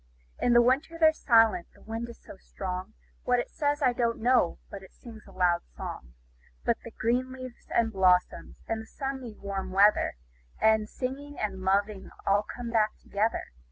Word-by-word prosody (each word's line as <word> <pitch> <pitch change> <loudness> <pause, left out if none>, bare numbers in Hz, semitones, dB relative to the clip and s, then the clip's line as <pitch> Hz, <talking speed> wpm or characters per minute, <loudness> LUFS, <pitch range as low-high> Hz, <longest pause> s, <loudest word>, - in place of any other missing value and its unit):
In 245 - +3
the 240 0 +7
winter 275 +7 +1
they're 315 -1 +6
silent 225 - +4
the - - -20
wind 225 +2 -5
is 235 - -11
so - - -12
strong; 185 +1 -6 0.3
What 250 0 +2
it 240 - -3
says, 290 -1 0
I 250 -2 +4
don't 235 -1 0
know, 240 -6 +3
but 200 - -7
it 190 - -15
sings 225 -3 -13
a - - -13
loud 175 -2 +2 0.2
song. - - -7 0.5
But - - +2 0.2
green 250 +3 0
leaves, 255 -2 -10
and 225 -1 +1
blossoms, 180 -2 +2
and 225 0 -3
sunny 265 -5 -5
warm 195 -1 -4
weather, 200 - +4 0.4
5 - - -9
And 215 -1 -2
singing, 280 +3 -5
and 195 -3 -3
loving 195 +1 0 0.2
all 200 +1 +3
come 235 +2 -7
back 215 -2 +1
together. 215 +3 -1
225 Hz, 175 wpm, -28 LUFS, 195-250 Hz, 0.5 s, the